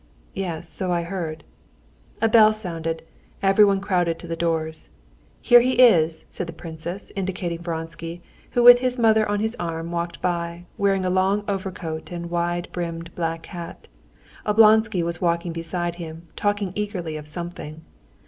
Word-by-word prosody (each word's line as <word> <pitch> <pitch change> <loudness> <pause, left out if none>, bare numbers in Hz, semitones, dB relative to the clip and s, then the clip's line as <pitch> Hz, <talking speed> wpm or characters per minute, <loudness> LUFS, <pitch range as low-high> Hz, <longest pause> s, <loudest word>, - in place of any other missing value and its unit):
"Yes, 175 -3 -4
so 185 +1 -2
I 170 -1 +1
heard." 170 -3 -5 0.8
A - - +6
bell 215 -1 +6
sounded. 165 -6 -4 0.4
Everyone 195 0 +5
crowded 180 -4 0
to - - -11
the 165 - -3
doors. 160 -1 -2 0.5
"Here 240 -1 +8
he 255 +2 +1
is!" 170 -11 +5
said 180 - -5
the 165 - -7
princess, 165 +3 -7
indicating 185 -3 -3
Vronsky, 165 0 -5 0.3
who 240 - +3
with 245 0 +10
his 255 0 0
mother 220 -2 +4
on 205 0 0
his 220 +2 -1
arm 165 0 -4
walked 170 0 -3
by, 170 -1 -2
wearing 195 -2 +1
a 180 - +1
long 190 +2 +2
overcoat 185 -5 -4
and 170 -1 -5
wide 175 0 -1
brimmed 170 -1 -5
black 165 -1 -3
hat. 170 -3 -9 0.6
Oblonsky 215 -2 +5
was 170 +1 -3
walking 170 -1 0
beside 170 +1 -3
him, 165 -1 -8
talking 205 -2 -1
eagerly 190 -7 -3
of 150 -1 -7
something. 160 -1 -7
175 Hz, 155 wpm, -23 LUFS, 165-200 Hz, 0.8 s, with